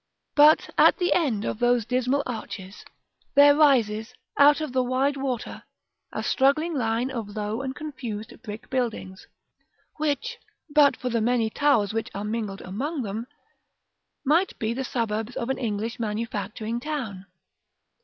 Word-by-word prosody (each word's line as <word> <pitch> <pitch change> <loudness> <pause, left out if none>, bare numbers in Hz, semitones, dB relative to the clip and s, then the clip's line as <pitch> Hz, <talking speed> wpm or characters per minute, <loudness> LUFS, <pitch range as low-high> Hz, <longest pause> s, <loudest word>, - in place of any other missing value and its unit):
But 300 +1 +6
at - - +6
the 360 -1 +2
end 250 - 0
of - - -3
those 245 -2 +2
dismal 255 +3 +1
arches, 210 -5 -7 0.5
there 285 +1 +8
rises, 245 -6 +3 0.2
out 290 +1 +6
of 305 -5 -4
the 260 - +3
wide 260 +3 +1
water, 265 -4 -4 0.5
a - - -4
straggling 295 +5 +2
line 240 -1 0
of 225 -5 -5
low 215 +3 -2
and 265 0 -4
confused 240 -8 -6
brick 215 -3 -9
buildings, 225 -7 -3 0.7
which, 310 +11 -2 0.3
but 290 -2 +5
for 250 - -3
the 230 -1 0
many 230 -1 +1
towers 230 -9 +2
which 225 0 -2
are 200 - -3
mingled 210 -2 -3
among 270 - -3
them, 220 +3 -4 1.0
might 335 +7 +2
be 220 +1 -1
the 265 +2 -3
suburbs 225 -2 -2
of 235 - -3
an - - -3
English 225 -1 -3
manufacturing 220 0 -3
town. 240 -10 -5
245 Hz, 145 wpm, -25 LUFS, 220-280 Hz, 1.0 s, there